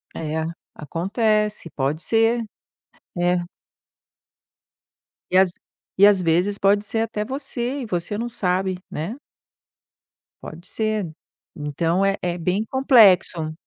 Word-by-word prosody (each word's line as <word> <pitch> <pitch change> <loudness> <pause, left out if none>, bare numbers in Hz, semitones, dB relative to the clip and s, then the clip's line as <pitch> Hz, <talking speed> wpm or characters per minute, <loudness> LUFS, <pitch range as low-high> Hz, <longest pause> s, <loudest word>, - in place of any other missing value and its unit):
É, 160 0 -3 0.3
acontece, 210 - -1
pode 140 +3 -2
ser. 225 +1 +2 0.8
É. 175 0 +1 1.9
E 185 - +4
às 190 -2 +4 0.4
e 200 +2 +7
às 200 -3 +4
vezes 180 +5 +2
pode 200 +1 +3
ser 225 +2 -1
até 220 -2 -2
você 270 +1 -4
e 245 - -5
você 180 +1 -3
não 235 +2 -3
sabe, 185 -4 -1
né. 165 +10 -4 1.3
Pode 170 +3 -10
ser, 215 -5 -1 0.5
então 165 +5 -1
é 195 0 +1
é 175 0 -2
bem 185 +5 -1
complexo. 200 - +4
195 Hz, 115 wpm, -22 LUFS, 175-220 Hz, 1.9 s, e